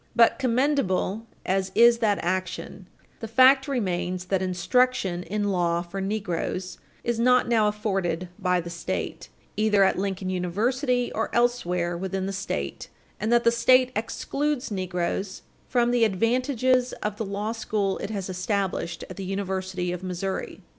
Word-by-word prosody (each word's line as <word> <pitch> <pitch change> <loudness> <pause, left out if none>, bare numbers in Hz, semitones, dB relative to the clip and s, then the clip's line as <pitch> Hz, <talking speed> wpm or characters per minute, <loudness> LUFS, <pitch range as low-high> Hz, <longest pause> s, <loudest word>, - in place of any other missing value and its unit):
But, 230 +2 +5
commendable 235 -5 +1 0.2
as 190 0 0
is 235 0 +6
that 210 -3 +2
action, 185 +1 -3 0.3
the 225 - -5
fact 260 +4 +6
remains 185 -8 -2
that 190 0 0
instruction 185 +1 +1
in 205 +2 -2
law 175 -2 +1
for 195 +3 -6
negroes 190 -2 -3 0.2
is 235 -1 -1
not 250 +1 +4
now 225 -3 +3
afforded 195 -5 -1
by 180 -2 +1
the 170 0 -8
State, 170 - -4 0.3
either 210 -2 +3
at 190 - +2
Lincoln 190 -1 -2
University 245 - 0
or - - -1
elsewhere 180 -8 +1
within 190 +2 -3
the 195 - -3
State, 190 0 -4 0.3
and 215 +2 -1
that 240 0 +4
the 235 - +5
State 255 +2 +4
excludes 275 +4 -2
negroes 185 0 -3 0.2
from 240 -1 +2
the 245 -1 +3
advantages 250 +4 +2
of 210 0 -2
the 225 - -2
law 200 +2 -3
school 210 -3 -1
it 200 - -4
has 200 -4 -3
established 185 -3 -2
at 185 - -10
the 195 - -5
University 190 -2 -2
of 180 0 -4
Missouri. 185 +1 -4
200 Hz, 150 wpm, -25 LUFS, 185-235 Hz, 0.3 s, is